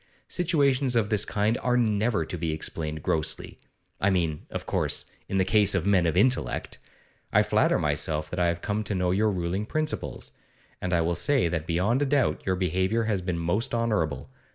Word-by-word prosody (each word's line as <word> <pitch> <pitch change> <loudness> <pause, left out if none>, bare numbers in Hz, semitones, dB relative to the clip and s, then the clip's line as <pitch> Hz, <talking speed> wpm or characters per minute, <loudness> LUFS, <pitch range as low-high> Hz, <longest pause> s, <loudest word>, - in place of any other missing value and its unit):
Situations 140 -7 +2
of 110 -3 +2
this 105 -1 +2
kind 105 +3 0
are 125 0 +2
never 110 -5 +1
to 90 - -5
be 80 -2 -2
explained 80 -1 -4
grossly; 80 - -2 0.4
I 100 - +2
mean, 85 -5 -1
of - - -5
course, - - 0 0.2
in 95 - 0
the 95 - +3
case 105 0 +3
of 95 -2 0
men 95 -4 +3
of 80 - 0
intellect. 125 +6 0 0.5
I - - +5
flatter - - +2
myself 75 +1 -1
that 90 - -3
I 90 - +3
have 85 0 -1
come 105 +1 -2
to 100 - -2
know 90 -1 +1
your 105 +4 +2
ruling 95 +2 -2
principles; 155 +2 -2 0.5
and 90 - -2
I 85 -2 +3
will 85 +1 0
say 105 +2 +2
that 80 -1 -3
beyond 95 +10 +1
a 145 - +2
doubt 140 -1 +1
your 95 - +2
behaviour 95 +5 0
has 105 -4 -1
been 90 -1 -2
most 90 +9 -1
honourable. 105 -10 -1
95 Hz, 195 wpm, -26 LUFS, 85-115 Hz, 0.5 s, I